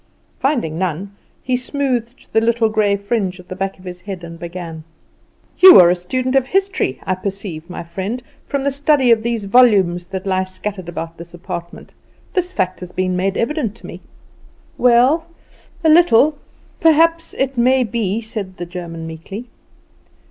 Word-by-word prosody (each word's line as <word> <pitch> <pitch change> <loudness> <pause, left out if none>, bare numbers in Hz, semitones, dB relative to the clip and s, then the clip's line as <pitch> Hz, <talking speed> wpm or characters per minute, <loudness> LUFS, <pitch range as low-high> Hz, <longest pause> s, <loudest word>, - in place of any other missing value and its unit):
Finding 235 - 0
none, 185 +2 -3 0.3
he 255 - 0
smoothed 255 -2 -2
the 220 - +4
little 230 0 +2
grey 215 -2 +2
fringe 200 -2 -2
at 180 - -14
the 185 - -5
back 195 +1 -3
of 185 - -17
his 180 -1 -8
head, 190 -3 -7
and 170 0 -9
began: 170 -2 -7 0.8
"You 370 0 +10
are 175 -1 +7
a - - +2
student 255 +9 -2
of 265 -1 +3
history, 385 - 0
I 185 - 0
perceive, 185 -3 -5
my 180 - -6
friend, 195 +8 -5 0.2
from 280 -1 -2
the 280 - +1
study 280 -2 +3
of 225 -1 +4
these 230 -1 -2
volumes 195 -6 +4
that 190 0 -6
lie 190 -1 0
scattered 185 -1 -6
about 165 -1 -6
this 170 0 -10
apartment; 170 0 -8 0.4
this 365 -1 0
fact 185 - -1
has 180 -1 -8
been 185 0 -1
made 190 +2 -1
evident 235 -4 -1
to - - -15
me." - - -9 0.7
"Well 250 +7 +4 0.6
a 320 - +4
little 310 -3 +5 0.4
perhaps 330 +1 +3
it 270 0 -1
may 255 +2 +3
be," 220 -1 -2
said 210 -4 -6
the 175 - -5
German 170 -2 -7
meekly. 180 +9 -8
200 Hz, 170 wpm, -18 LUFS, 180-255 Hz, 0.8 s, You